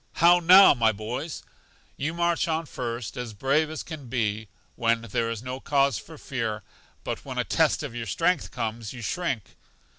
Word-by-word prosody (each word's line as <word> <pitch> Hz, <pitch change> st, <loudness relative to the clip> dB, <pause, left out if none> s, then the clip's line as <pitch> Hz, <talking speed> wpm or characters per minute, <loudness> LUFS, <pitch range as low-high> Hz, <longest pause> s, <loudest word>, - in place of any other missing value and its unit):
How 175 Hz, +1 st, +6 dB
now, 185 Hz, +3 st, +8 dB
my 115 Hz, -4 st, +3 dB
boys! 120 Hz, +9 st, -5 dB, 0.5 s
You 155 Hz, +4 st, -3 dB
march 170 Hz, 0 st, +1 dB
on 165 Hz, 0 st, -1 dB
first, 120 Hz, -5 st, -5 dB
as 120 Hz, -3 st, -5 dB
brave 140 Hz, +7 st, +1 dB
as 155 Hz, -, -5 dB
can 155 Hz, -6 st, -8 dB
be, 110 Hz, -3 st, -1 dB, 0.3 s
when 115 Hz, 0 st, +1 dB
there 115 Hz, +1 st, -1 dB
is 115 Hz, 0 st, -5 dB
no 130 Hz, +1 st, -5 dB
cause 140 Hz, 0 st, +2 dB
for 160 Hz, -, -12 dB
fear; 115 Hz, -7 st, -3 dB, 0.4 s
but -, -, -4 dB
when -, -, -7 dB
a -, -, +2 dB
test -, -, +1 dB
of -, -, -5 dB
your 115 Hz, -1 st, -5 dB
strength 160 Hz, -, +1 dB
comes, 115 Hz, -2 st, -4 dB
you 120 Hz, -2 st, -8 dB
shrink. 120 Hz, -, -3 dB
125 Hz, 180 wpm, -26 LUFS, 115-155 Hz, 0.5 s, now